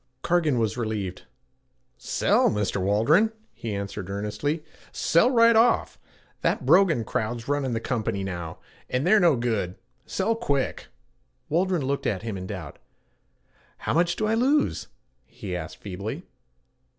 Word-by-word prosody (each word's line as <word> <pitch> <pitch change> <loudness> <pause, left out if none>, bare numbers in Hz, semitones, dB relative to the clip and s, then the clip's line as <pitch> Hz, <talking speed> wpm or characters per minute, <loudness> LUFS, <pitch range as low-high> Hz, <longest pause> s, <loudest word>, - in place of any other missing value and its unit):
Cargan 165 -6 +2
was 115 0 0
relieved. 105 -6 -3 0.7
'Sell, - - +2
Mr. 105 -2 -1
Waldron,' 115 - +3 0.2
he 110 -3 -5
answered 100 -1 -5
earnestly, 105 +10 -2 0.3
'sell 170 +9 +3
right 230 -2 +5
off. 230 +1 +3 0.4
That - - 0
Brogan 170 -12 +5
crowd's 115 +3 -3
runnin' 140 -3 0
the 115 - 0
company 110 -5 -2
now, 85 -4 -5 0.3
and 130 +4 0
they're 210 +4 +6
no 170 -6 +5
good, 110 -7 -1 0.3
sell 200 +4 0
quick.' 140 - -1 0.6
Waldron 175 -2 +1
looked 140 +1 -1
at 100 -1 -1
him 110 -3 -4
in 95 -1 -6
doubt. 90 -6 -7 1.0
'How - - -2
much 170 +2 +2
do 215 - -1
I 215 - +1
lose?' 275 +6 +1 0.4
he - - -7
asked - - -6
feebly. - - -6
125 Hz, 140 wpm, -25 LUFS, -, 1.0 s, they're